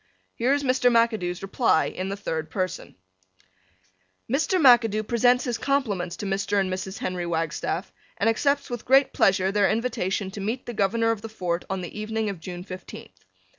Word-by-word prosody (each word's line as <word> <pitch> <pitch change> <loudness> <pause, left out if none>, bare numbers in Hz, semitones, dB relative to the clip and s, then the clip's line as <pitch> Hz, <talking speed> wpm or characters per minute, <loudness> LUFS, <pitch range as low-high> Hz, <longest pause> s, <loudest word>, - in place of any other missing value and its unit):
Here 245 +3 0
is 285 0 +1
Mr. 255 -1 +3
McAdoo's 220 -7 +1
reply 195 -4 +2
in 185 +1 -4
the 195 - -4
third 160 -5 -4
person: 185 0 -4 1.3
Mr. 310 - +1
McAdoo 230 -6 +5
presents 245 +1 +3
his 240 -3 -2
compliments 210 -11 -1
to - - -5
Mr. 200 +1 0
and 190 -1 0
Mrs. 190 +1 -5
Henry 180 -1 -3
Wagstaff 165 +2 -2 0.2
and 200 - +1
accepts 280 +5 +1
with 240 -2 -4
great 270 +1 +4
pleasure 190 0 +3
their 205 -1 +3
invitation 215 -5 -1
to 200 - -7
meet 225 +6 -3
the 240 - -5
Governor 225 +3 +1
of 225 -2 -3
the 225 - -7
Fort 180 -5 -3
on 190 -1 -2
the 180 +4 -7
evening 220 0 -2
of 190 - -9
June 175 +1 -7
fifteenth. 185 -1 -11
210 Hz, 175 wpm, -25 LUFS, 185-240 Hz, 1.3 s, McAdoo